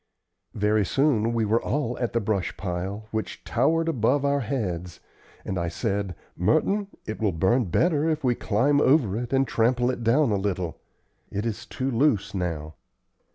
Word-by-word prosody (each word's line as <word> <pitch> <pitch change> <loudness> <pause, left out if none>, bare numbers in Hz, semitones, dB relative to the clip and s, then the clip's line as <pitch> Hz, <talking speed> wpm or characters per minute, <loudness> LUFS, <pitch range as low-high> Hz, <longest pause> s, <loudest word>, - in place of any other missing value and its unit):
Very 105 0 +2
soon 115 -1 +2
we 115 -1 +1
were 110 +3 +2
all 135 -4 -1
at 120 - -1
the 115 - +2
brush 100 -3 -2
pile, 95 +3 -4
which 110 0 -4
towered 165 +1 +1
above 135 0 +1
our 140 0 +2
heads, 90 -9 -3 0.5
and 95 - -2
I 85 - -1
said: 100 +1 -2 0.2
"Merton, 160 - +1 0.2
it 110 - -5
will 105 -3 +2
burn 95 +9 +2
better 155 - +2
if 155 -2 -1
we 125 -2 +3
climb 125 +7 +2
over 130 -9 +3
it 120 +1 -4
and 135 0 +2
trample 120 +2 +2
it 120 - -5
down 120 +3 +3
a 100 - +2
little. 95 -4 -2 0.5
It 100 +3 -3
is 115 +2 -4
too 135 0 -3
loose 120 -5 +2
now. 80 -5 -3
115 Hz, 170 wpm, -25 LUFS, 100-135 Hz, 0.5 s, we